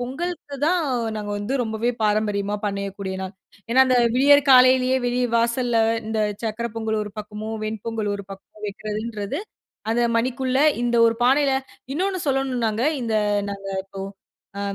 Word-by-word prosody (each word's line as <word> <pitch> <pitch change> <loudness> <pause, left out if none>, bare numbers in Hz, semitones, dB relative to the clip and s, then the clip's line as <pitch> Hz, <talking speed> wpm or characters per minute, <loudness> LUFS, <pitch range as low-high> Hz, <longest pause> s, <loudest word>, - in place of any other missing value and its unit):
பொங்கலுக்கு 290 +3 -4
தான் 355 +1 +3 0.4
நாங்க 210 -1 -4
வந்து 205 +5 -3
ரொம்பவே 220 +1 -1
பாரம்பரியமா 210 -1 +1
பண்ணயக்கூடிய 200 -1 -4
நாள். 190 0 -5 0.4
ஏன்னா 260 +3 +5
அந்த 255 - +3 0.2
விடியர் 285 +2 +5
காலையிலியே 255 0 +6
வெளிய 245 +1 +1
வாசல்ல 235 0 +1 0.3
இந்த 220 0 -1 0.2
சர்க்கரை 230 +1 -2
பொங்கல் 220 -1 -1
ஒரு 210 - -9
பக்கமோ 210 +1 -6 0.2
வெண்பொங்கல் 215 0 -3
ஒரு 200 -1 -6
பக்கமோ 195 +2 -12
வக்கிறதுன்றது 215 - -4 0.5
அத 230 +1 +1 0.2
மணிக்குள்ள 255 +2 0 0.2
இந்த 240 0 +1
ஒரு 230 - +2
பானையில 275 +2 +4 0.4
இன்னொன்னு 370 +5 -1
சொல்லனும்னாங்க 250 -5 0 0.2
இந்த 225 -2 -1 0.4
நாங்க 195 0 -6 0.2
இப்போ 195 0 -9 0.6
அ - - -3
230 Hz, 140 wpm, -23 LUFS, 210-255 Hz, 0.6 s, காலையிலியே